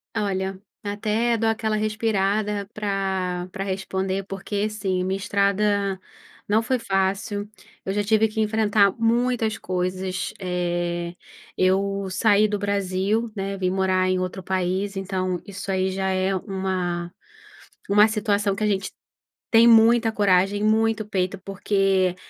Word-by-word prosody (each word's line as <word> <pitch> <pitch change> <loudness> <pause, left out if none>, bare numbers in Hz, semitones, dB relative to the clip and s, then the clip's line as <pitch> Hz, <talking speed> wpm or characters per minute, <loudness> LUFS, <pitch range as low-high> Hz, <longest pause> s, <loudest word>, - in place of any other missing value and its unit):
Olha, 190 -2 -2 0.2
até 215 +3 0
dou 225 0 +1
aquela 220 -1 0
respirada 210 -1 0
pra 190 -3 -2
pra 195 -1 -4
responder, 190 0 -2
porque 195 +1 -4
assim, 190 -4 -2
minha 190 +1 -1
estrada 200 -1 +1 0.5
não 220 +2 +2
foi 255 +1 0
fácil, 200 0 -1 0.4
eu 190 - -1
já 205 0 0
tive 220 +1 +3
que 215 - -5
enfrentar 210 -2 +3
muitas 230 -1 +1
coisas, 185 0 -3
eh, 175 -2 -2 0.4
eu 195 +1 +1
saí 210 +2 +3
do 210 0 -1
Brasil, 200 +3 0
né, 195 0 -3
vim 185 -1 0
morar 185 0 +1
em 185 - +2
outro 185 +1 -4
país, 190 +2 -1
então 185 -2 -2
isso 200 -1 -8
aí 190 0 0
já 190 0 -1
é 190 +1 +1
uma 185 -2 -3 0.8
uma 210 +2 +6
situação 205 -2 0
que 215 - -3
a - - +3
gente 195 -2 -1 0.6
tem 230 0 +7
muita 230 0 +6
coragem, 200 0 +2
muito 220 0 +2
peito, 185 -2 -1
porque 195 -2 +1
195 Hz, 135 wpm, -24 LUFS, 190-215 Hz, 0.8 s, tem